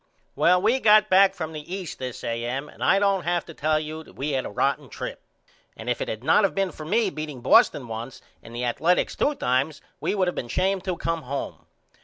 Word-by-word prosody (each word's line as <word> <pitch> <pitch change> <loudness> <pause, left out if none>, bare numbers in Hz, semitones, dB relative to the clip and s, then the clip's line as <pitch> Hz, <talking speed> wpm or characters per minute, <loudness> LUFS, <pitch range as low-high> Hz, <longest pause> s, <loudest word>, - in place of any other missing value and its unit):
Well 180 +1 +4
we 240 +8 +2
got 215 -2 +5
back 195 +1 +6
from 160 -3 -5
the 155 +2 -8
East 185 -5 -7
this 130 -2 -6
A.M. 120 +5 -3
and - - -9
I 195 - +4
don't 200 -1 +2
have 175 0 -1
to 165 - -10
tell 155 +1 +1
you 155 +1 -6 0.2
we 145 +3 -2
had 130 -2 -1
a - - -7
rotten 140 +5 -1
trip - - -6 0.6
and 115 +2 -3
if 120 - -2
it - - -2
had 110 +2 -5
not 160 +8 +4
of 195 - +1
been 195 -2 0
for 155 - -9
me 210 +2 +2
beating 150 -5 -6
Boston 210 - +4
once 115 +3 -6 0.2
and 115 - -12
the 120 - -3
Athaletics 165 +9 +1
two 295 - +1
times 140 - 0 0.2
we - - -1
would 190 -2 +1
of 180 - 0
been 120 - -5
ashamed 190 +7 0
to 185 -3 -2
come 165 0 -2
home. 140 0 -6
155 Hz, 230 wpm, -25 LUFS, 130-190 Hz, 0.6 s, back